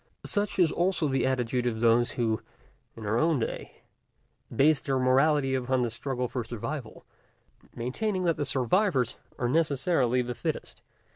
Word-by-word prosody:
Such 205 -1 -1
also 175 -2 0
is 145 - 0
the 135 0 +1
attitude 125 -1 0
of 110 -2 -2
those 115 +1 +3
who, 110 -3 0 0.5
in 110 - -8
our 110 +3 +1
own 160 -3 +2
day, 115 - -5 0.7
base 150 +1 +4
their 135 -1 -1
morality 135 +2 +3
upon 130 0 0
the 120 - -1
struggle 125 +1 -2
for 125 0 -3
survival, 120 +3 -6 0.7
maintaining 185 - -2
that 170 -2 +1
the - - -1
survivors 135 - +1 0.2
are 120 - -1
necessarily 135 -3 +1
the 125 0 -4
fittest. - - -5
130 Hz, 150 wpm, -28 LUFS, 120-155 Hz, 0.7 s, base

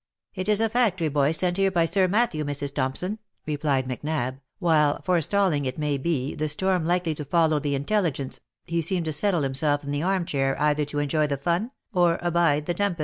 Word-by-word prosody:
"*' - - -61
It 185 +1 -4
is 210 -1 +3
a 225 - +3
factory 210 -8 +1
boy 140 -1 +2
sent 175 +3 +3
here 195 0 +3
by 175 -3 +2
Sir 190 +2 +2
Matthew, 195 -6 +1
Mrs. 145 -1 -2
Thompson," 145 +10 -2 0.3
replied 145 -3 0
Macnab, 130 0 -3 0.2
while, 155 -6 +2
forestalling, 175 -3 +1
it 130 0 -3
may 150 -2 -1
be, 140 -3 -1
the 155 0 -2
storm 180 +1 +1
likely 175 -2 +1
to 150 - -6
follow 160 +1 +2
the 145 -1 -1
intelligence, 145 -3 -1 0.3
he 170 0 -1
seemed 170 +1 0
to 155 - -1
settle 175 0 +1
himself 145 +2 0
in 140 - -5
the 145 0 -1
arm 185 0 0
chair 135 -3 -1
either 150 0 +2
to 145 0 -6
enjoy 150 +1 +1
the 140 -1 -2
fun, 175 - -1 0.2
or 175 -2 +3
abide 170 -4 +2
the 175 - -1
tempest. 195 -1 -1
155 Hz, 205 wpm, -25 LUFS, 145-180 Hz, 0.3 s, is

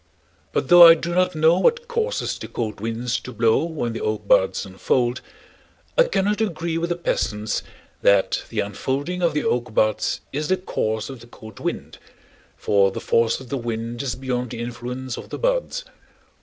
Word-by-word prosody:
But - - -1
though 175 -1 +11
I 165 - +9
do 170 +1 -4
not 185 0 +2
know 160 +3 +4
what 475 - +2
causes 475 0 -2
the - - -6
cold 110 -3 -4
winds 115 +2 -2
to 125 - -9
blow 115 +2 +2
when 150 -9 -3
the 115 - -5
oak 105 -1 -2
buds 95 +1 +3
unfold, 120 +6 0 0.7
I - - +5
cannot 210 - 0
agree 170 -5 -1
with 170 +1 -2
the 175 - 0
peasants 110 -10 -1 0.4
that 100 -1 +3
the - - -1
unfolding 135 - -3
of 170 -3 +1
the 150 - 0
oak 120 -2 -1
buds 110 -1 +1
is 150 +2 -2
the 185 - +2
cause 110 - -2
of 130 - -9
the 120 - -14
cold 110 -3 -13
wind, - - -5 0.6
for 100 -1 +3
the 95 - -6
force 115 0 +1
of 130 -2 -12
the 140 - -2
wind 115 0 -4
is 135 -4 -2
beyond 125 -2 -3
the 115 - -7
influence 120 +1 -5
of - - -9
the - - -5
buds. - - -1
125 Hz, 185 wpm, -22 LUFS, 115-170 Hz, 0.7 s, though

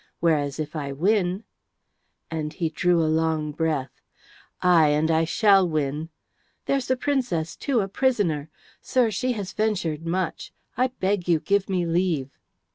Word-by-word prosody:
Whereas, 150 -3 +1
if 155 +1 -4
I 140 -2 -3
win 185 +5 +1 0.4
" - - -43
and 155 -2 -3
he 165 -2 -1
drew 170 +1 +2
a - - +1
long 160 -1 0
breath. 150 -3 -2 0.6
"Aye, 175 -4 +5
and 150 +2 +2
I 160 0 +3
shall 195 +1 +4
win! 155 +1 -2 0.6
There's 275 -2 0
the 260 - +1
Princess, 250 - -1
too, 255 -5 0
a 195 - -2
prisoner. 195 - 0 0.3
Sir, 245 -4 +1
she 250 +6 -1
has 200 -4 -5
ventured 190 -8 -1
much. 180 +3 -3 0.2
I 255 - +2
beg 195 -7 -2
you 170 -2 +3
give 200 +3 0
me 180 -2 0
leave." 165 -5 0
170 Hz, 155 wpm, -24 LUFS, 155-200 Hz, 0.6 s, Aye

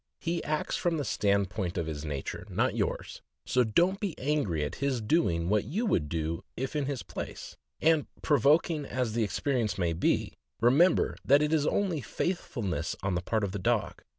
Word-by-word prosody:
He 170 0 -2
acts 155 0 -1
from 170 -2 0
the 145 - -2
stand 100 -3 +1
point 95 -6 -3
of 85 - 0
his 75 -2 -5
nature, 70 -3 -5
not - - +1
yours, - - -2 0.2
so 125 - +3
don't 175 - +2
be 195 -6 -3
angry 130 - 0
at 75 - -4
his 140 -3 +1
doing 105 - +1
what 105 +1 +2
you 210 - -1
would 75 - +1
do 80 0 -2
if 135 +4 -3
in 145 -3 0
his 140 -4 -3
place; - - -7 0.2
and, 160 -1 +3 0.2
provoking 150 +2 +3
as 125 -5 -2
the 115 0 +1
expe 140 +7 -1
rience 110 -7 0
may 85 -3 +1
be, 80 - +1 0.3
remember 145 +10 +4
that 140 +3 +5
it 150 +1 +1
is 150 -2 +2
only 185 -7 0
faithfulness 110 - -2
on 95 -1 0
the 90 - 0
part 110 +4 -1
of 100 - -1
the 100 - -4
dog. 90 - 0
125 Hz, 195 wpm, -29 LUFS, 95-150 Hz, 0.3 s, that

